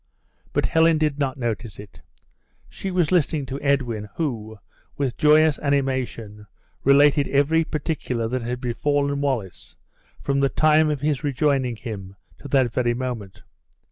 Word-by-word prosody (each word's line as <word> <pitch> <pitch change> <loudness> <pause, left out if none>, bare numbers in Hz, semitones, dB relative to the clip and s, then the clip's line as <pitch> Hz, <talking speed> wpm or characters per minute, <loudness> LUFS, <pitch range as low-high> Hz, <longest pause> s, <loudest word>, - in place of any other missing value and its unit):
But - - 0
Helen 160 0 +3
did 150 -2 0
not 135 -2 -1
notice 115 -3 -4
it; 100 -5 -13 0.7
she 195 - -6
was 180 -3 +1
listening 155 -4 +1
to 135 +2 -6
Edwin, 120 -7 -1
who, 110 -9 -4 0.4
with 135 -4 -1
joyous 155 -1 +4
animation, 130 -7 -2 0.4
related 140 +1 +5
every 145 +4 +2
particular 145 -7 -3
that 130 +1 -2
had 120 +1 -4
befallen 140 +3 -1
Wallace 120 -11 -3 0.4
from 140 0 -1
the 140 0 +2
time 155 +1 +3
of 145 -3 -2
his 150 -1 -1
rejoining 135 -3 0
him 105 -4 -8 0.2
to 145 - -9
that 130 -4 +2
very 120 -1 +1
moment. 120 -6 -6
140 Hz, 140 wpm, -23 LUFS, 120-150 Hz, 0.7 s, related